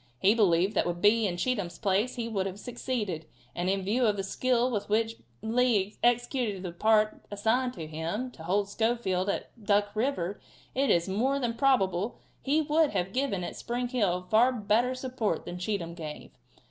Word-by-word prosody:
He 190 +10 +4
believed 190 -3 +3
that - - +1
with 175 0 -2
Bee 210 +3 +4
in 175 -2 -3
Cheatham's 200 -3 -1
place 205 +4 +1
he 235 -2 -3
would 195 -4 -1
have 195 +1 -7
succeeded, 210 -9 -3 0.3
and 175 +1 -1
in 195 0 0
view 230 +5 +2
of 205 -1 +1
the 195 - -2
skill 250 +5 +1
with 210 -3 -3
which 225 +1 +1 0.3
Lee 220 -3 +2
executed 240 -4 +1
the 180 - -4
part 215 +4 +2
assigned 225 +5 +1
to 165 - -6
him 165 +11 -4
to 170 - -14
hold 195 +5 0
Schofield 205 -3 0
at 220 +2 -4
Duck 205 0 +2
river, 215 -6 -1 0.3
it 275 +1 +1
is 170 +1 +3
more 245 +9 +1
than 240 -4 -1
probable 230 -6 +1 0.2
he 295 +3 +2
would 305 +1 +3
have 190 0 -1
given 255 -9 0
at - - -5
Spring 245 +1 -3
Hill 190 -8 0
far 235 +4 +5
better 235 +2 +1
support 255 -8 -2
than 175 - -6
Cheatham 180 -3 -2
gave. 155 -3 -8
210 Hz, 185 wpm, -29 LUFS, 190-245 Hz, 0.3 s, far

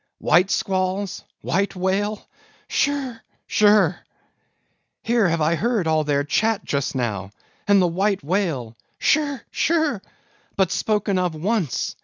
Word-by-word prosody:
White 180 +5 +3
squalls? 190 +1 -1 0.2
white 195 +4 -1
whale, 200 +3 -1 0.4
shirr! 275 -5 -1 0.3
shirr! 205 -5 +4 1.0
Here 230 -5 +2
have 165 -1 0
I 155 +2 +3
heard 215 +1 0
all 155 -1 +2
their 145 -1 +1
chat 215 +8 0
just 140 -1 -2
now, 105 -7 -2 0.4
and 200 -1 +5
the 185 - +4
white 190 +2 0
whale—shirr! 180 - -1
shirr!—but 280 - -2
spoken 205 -3 0
of 180 -3 -1
once! 180 - -1
190 Hz, 115 wpm, -22 LUFS, 160-215 Hz, 1.0 s, and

